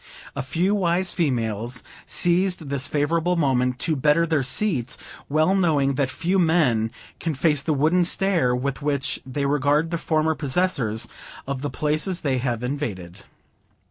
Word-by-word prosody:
A -, -, -2 dB
few 170 Hz, +9 st, 0 dB
wise 180 Hz, -2 st, +1 dB
females 120 Hz, -, -1 dB, 0.2 s
seized 175 Hz, -3 st, +1 dB
this 140 Hz, -1 st, -1 dB
favorable 165 Hz, +4 st, +1 dB
moment 125 Hz, -5 st, +1 dB
to 160 Hz, -, +1 dB
better 150 Hz, +4 st, +3 dB
their 160 Hz, -3 st, +1 dB
seats, 130 Hz, -, 0 dB, 0.3 s
well 155 Hz, +5 st, +3 dB
knowing 155 Hz, -8 st, +2 dB
that 135 Hz, -1 st, 0 dB
few 180 Hz, +7 st, 0 dB
men 150 Hz, -10 st, +2 dB, 0.3 s
can 160 Hz, -3 st, -2 dB
face 150 Hz, +1 st, +3 dB
the 160 Hz, -, -1 dB
wooden 155 Hz, +5 st, +3 dB
stare 170 Hz, -8 st, +2 dB
with 135 Hz, +3 st, -3 dB
which 140 Hz, -2 st, -1 dB
they 140 Hz, +2 st, -2 dB
regard 145 Hz, +3 st, +1 dB
the 170 Hz, -, -1 dB
former 160 Hz, 0 st, +1 dB
possessors 135 Hz, -7 st, 0 dB, 0.4 s
of 135 Hz, -1 st, -4 dB
the 145 Hz, -, -2 dB
places 155 Hz, +7 st, -1 dB
they 135 Hz, -4 st, 0 dB
have 120 Hz, -2 st, -2 dB
invaded. 110 Hz, -, -5 dB
145 Hz, 150 wpm, -23 LUFS, 130-170 Hz, 0.4 s, better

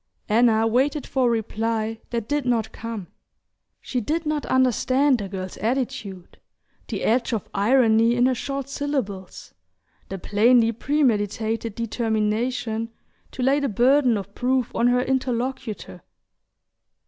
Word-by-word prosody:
Anna 225 Hz, 0 st, +4 dB
waited 270 Hz, +6 st, +1 dB
for 260 Hz, -2 st, +1 dB
a -, -, +3 dB
reply 225 Hz, 0 st, -2 dB
that 230 Hz, -2 st, -3 dB
did 290 Hz, +2 st, 0 dB
not 235 Hz, -3 st, 0 dB
come. 225 Hz, -4 st, -6 dB, 0.7 s
She 250 Hz, -, -3 dB
did 320 Hz, +8 st, -2 dB
not 300 Hz, -1 st, -2 dB
understand 260 Hz, +1 st, +2 dB
the 200 Hz, -2 st, -5 dB
girl's 185 Hz, -1 st, -6 dB
attitude, 225 Hz, -6 st, -3 dB, 0.5 s
the -, -, -4 dB
edge 240 Hz, +1 st, +1 dB
of 220 Hz, -, -2 dB
irony 230 Hz, +1 st, +4 dB
in 245 Hz, 0 st, +3 dB
her 260 Hz, -, +3 dB
short 275 Hz, +2 st, -4 dB
syllables, 265 Hz, -10 st, -4 dB, 0.6 s
the 195 Hz, -, -4 dB
plainly 225 Hz, +4 st, +3 dB
premeditated 225 Hz, -4 st, 0 dB
determination 225 Hz, +1 st, -1 dB, 0.4 s
to 255 Hz, -, -5 dB
lay 275 Hz, +3 st, +3 dB
the 280 Hz, -2 st, -1 dB
burden 250 Hz, +2 st, +3 dB
of 200 Hz, 0 st, -7 dB
proof 255 Hz, 0 st, 0 dB
on 235 Hz, -, +2 dB
her 250 Hz, 0 st, +3 dB
interlocutor. 255 Hz, -3 st, -3 dB
235 Hz, 130 wpm, -23 LUFS, 220-260 Hz, 0.7 s, Anna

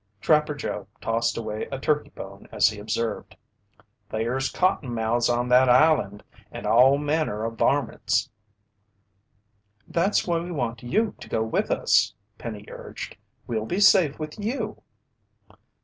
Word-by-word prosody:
Trapper 150 Hz, +3 st, +2 dB
Joe 105 Hz, -8 st, -5 dB
tossed 115 Hz, +1 st, 0 dB
away 110 Hz, -1 st, -4 dB
a 135 Hz, -, -3 dB
turkey 150 Hz, +2 st, 0 dB
bone -, -, -11 dB
as -, -, +4 dB
he 105 Hz, -1 st, -8 dB
observed: 110 Hz, +2 st, -3 dB, 0.7 s
"There's 120 Hz, +5 st, -1 dB
cottonmouths 120 Hz, -10 st, +1 dB
on 120 Hz, 0 st, +1 dB
that 125 Hz, +1 st, +5 dB
island 125 Hz, -6 st, +3 dB, 0.3 s
and -, -, -7 dB
all 125 Hz, +6 st, +5 dB
manner 145 Hz, -7 st, -1 dB
o' 115 Hz, -, -2 dB
varmints." 115 Hz, -, +1 dB, 1.6 s
"That's 190 Hz, +5 st, +1 dB
why 170 Hz, -2 st, +1 dB
we 175 Hz, +2 st, -6 dB
want 120 Hz, -7 st, -3 dB
you 210 Hz, -, 0 dB
to -, -, -11 dB
go 110 Hz, -, 0 dB
with 110 Hz, -, -1 dB
us," -, -, +2 dB, 0.2 s
Penny 105 Hz, -3 st, -7 dB
urged. -, -, -8 dB, 0.3 s
"We'll 110 Hz, -2 st, -3 dB
be 180 Hz, -, -1 dB
safe 185 Hz, -7 st, +5 dB
with 155 Hz, +5 st, -7 dB
you." 215 Hz, 0 st, -3 dB
125 Hz, 135 wpm, -25 LUFS, 115-155 Hz, 1.6 s, that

